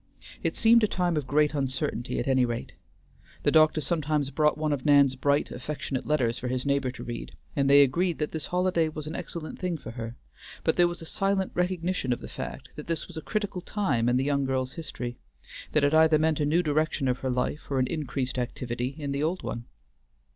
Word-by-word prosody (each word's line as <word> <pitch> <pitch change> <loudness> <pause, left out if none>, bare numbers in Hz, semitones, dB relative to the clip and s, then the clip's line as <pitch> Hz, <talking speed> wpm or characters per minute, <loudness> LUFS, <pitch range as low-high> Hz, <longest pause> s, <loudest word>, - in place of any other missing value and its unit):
It - - -1
seemed 230 0 +5
a - - +5
time 180 -3 0
of 145 -4 -2
great 150 +2 +3
uncertainty, 135 -3 -2
at - - -2
any 130 -1 +4
rate. 120 -1 -2 0.7
The - - +3
doctor 155 0 +5
sometimes 150 -2 0
brought 150 +2 +2
one 155 -1 0
of 135 -3 -3
Nan's 140 -3 +5
bright, 140 +2 +1
affectionate 135 0 -4
letters 130 -6 +1
for 125 - -4
his 130 +1 -2
neighbor 140 -2 +1
to 125 - -8
read, 120 -1 -6 0.2
and 140 -1 +2
they 140 0 +8
agreed 170 +6 +1
that 150 - -2
this 160 - -3
holiday 180 -3 +1
was 155 -1 -6
an 155 - -5
excellent 160 -2 -6
thing 180 -3 -1
for 115 - -8
her, 115 0 -6 0.5
but 160 - +2
there 175 -1 +5
was 175 -1 -6
a - - -8
silent 195 +2 0
recognition 180 -5 -1
of 120 - 0
the - - -8
fact - - -7
that 150 - -7
this 165 -2 -2
was 180 - -12
a 160 - -4
critical 205 -2 -2
time 135 - 0
in 125 - +3
the 130 - +1
young 140 0 +1
girl's 130 -1 -1
history; 125 -7 -6 0.5
that 150 - +3
it 145 +1 +3
either 160 0 +6
meant 155 0 +1
a 145 - +1
new 170 +4 +3
direction 155 -2 +1
of 125 0 0
her 130 - -2
life 125 +4 -2
or 140 - 0
an 130 - +3
increased 130 -3 -2
activity 125 +1 -3
in 145 -3 -3
the 140 +1 -1
old 170 +4 -1
one. 115 0 -4
145 Hz, 220 wpm, -27 LUFS, 130-160 Hz, 0.7 s, they